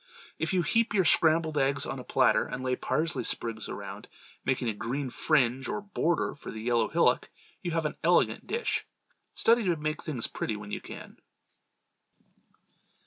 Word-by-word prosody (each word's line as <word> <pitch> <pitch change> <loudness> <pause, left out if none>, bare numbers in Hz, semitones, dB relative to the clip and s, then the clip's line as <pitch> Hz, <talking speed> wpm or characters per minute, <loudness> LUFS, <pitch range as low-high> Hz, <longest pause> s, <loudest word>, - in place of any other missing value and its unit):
If 160 - -1
you 180 -2 +3
heap 225 +5 +1
your 190 -3 +4
scrambled 160 -1 +4
eggs 135 0 +1
on 135 - -4
a - - -7
platter 130 0 +3
and 130 +1 -5
lay 130 0 +1
parsley 160 +5 -1
sprigs 115 -2 -2
around, - - -7 0.4
making 130 -2 0
a 110 - 0
green 130 +5 -3
fringe 130 0 +2
or 210 - -2
border 180 -4 0
for - - -10
the 110 - -6
yellow 115 0 +2
hillock, - - +2 0.3
you 175 - -3
have 165 -1 -1
an 150 - -2
elegant - - +3
dish. 465 +1 -1 0.5
Study 230 +1 +4
to 175 -2 +2
make 155 0 -2
plain 155 - -5
things 115 - 0
pretty 110 - -3
when 105 0 -8
you - - -3
can. - - -10
145 Hz, 175 wpm, -29 LUFS, 125-165 Hz, 0.5 s, your